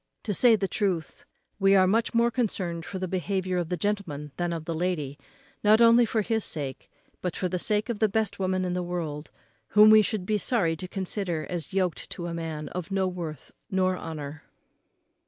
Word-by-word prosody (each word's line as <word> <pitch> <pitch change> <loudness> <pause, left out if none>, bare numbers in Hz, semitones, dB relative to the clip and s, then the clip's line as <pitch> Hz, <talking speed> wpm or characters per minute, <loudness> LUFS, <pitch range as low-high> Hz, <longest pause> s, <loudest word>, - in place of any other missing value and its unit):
To 210 - -1
say 235 +3 +5
the 200 -2 -1
truth, 185 -6 -2 0.3
we 195 0 +5
are 190 -1 +6
much 220 +5 +2
more 235 +1 +4
concerned 185 -8 -2
for 195 - -5
the 185 0 -3
behaviour 185 0 -1
of 170 -2 -3
the 180 - -1
gentleman 160 -7 -3
than 175 -1 -1
of 165 -2 -4
the 165 - -2
lady, 160 -5 -2 0.4
not 215 +1 +6
only 235 +1 +7
for 220 -1 0
his 225 0 0
sake, 140 -4 -5 0.3
but 180 - -2
for 185 - -1
the 180 0 -2
sake 210 +3 +1
of 235 -4 -3
the 220 - +3
best 215 -1 -1
woman 185 -1 0
in 180 - -1
the 180 - -1
world, 165 -4 -4 0.4
whom 210 +1 +7
we 215 0 +8
should 210 -3 -2
be 210 +1 +1
sorry 185 -8 +1
to 180 +3 -7
consider 185 -4 -3
as 170 -4 -4
yoked 185 -3 -1
to 170 - -6
a 170 - -4
man 160 -2 -4
of 180 0 -5
no 195 -1 +1
worth 170 -5 -6 0.2
nor 185 -2 +1
honour. 155 -3 -6
185 Hz, 205 wpm, -27 LUFS, 170-210 Hz, 0.4 s, we